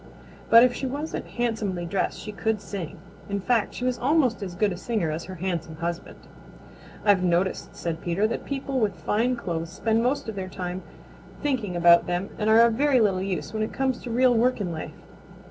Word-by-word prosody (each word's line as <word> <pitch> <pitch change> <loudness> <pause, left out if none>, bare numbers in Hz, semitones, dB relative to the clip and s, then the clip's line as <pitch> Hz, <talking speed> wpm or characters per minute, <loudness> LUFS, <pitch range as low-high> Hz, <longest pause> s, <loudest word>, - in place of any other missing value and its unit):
But 230 +1 +9
if 250 -1 +4
she 265 +2 -3
wasn't 290 +5 -4
handsomely 220 -7 -2
dressed 190 +3 -1
she 210 - -6
could 220 +1 -1
sing. 195 -5 -6 0.3
In 200 0 -1
fact 225 +1 0
she 250 - -3
was 255 -1 0
almost 260 -4 +2
as 185 -3 -5
good 205 +2 +2
a - - -3
singer 185 -4 -1
as 160 +2 -4
her 185 - -8
handsome 170 -3 -3
husband. 170 +1 -4 0.9
"I've 200 -3 +5
noticed," 180 +1 0
said 165 -1 -4
Peter, 175 +4 0
"that 225 - -2
people 270 -1 -2
with 210 -5 +1
fine 220 +9 0
clothes 170 -7 -4
spend 220 +5 0
most 270 +3 0
of 220 - -3
their 190 -2 -5
time 180 0 -5 0.6
thinking 240 -11 -1
about 170 0 +6
them 175 +3 -2
and 215 0 +1
are 220 +1 +7
of 235 -1 +5
very 275 +2 +3
little 195 -4 +2
use 190 +1 -3
when 215 - -2
it 215 - -2
comes 265 -2 0
to 245 - -7
real 250 +2 +4
work 240 +2 +2
in 185 -4 -2
life." 160 - -7
210 Hz, 205 wpm, -25 LUFS, 180-240 Hz, 0.9 s, But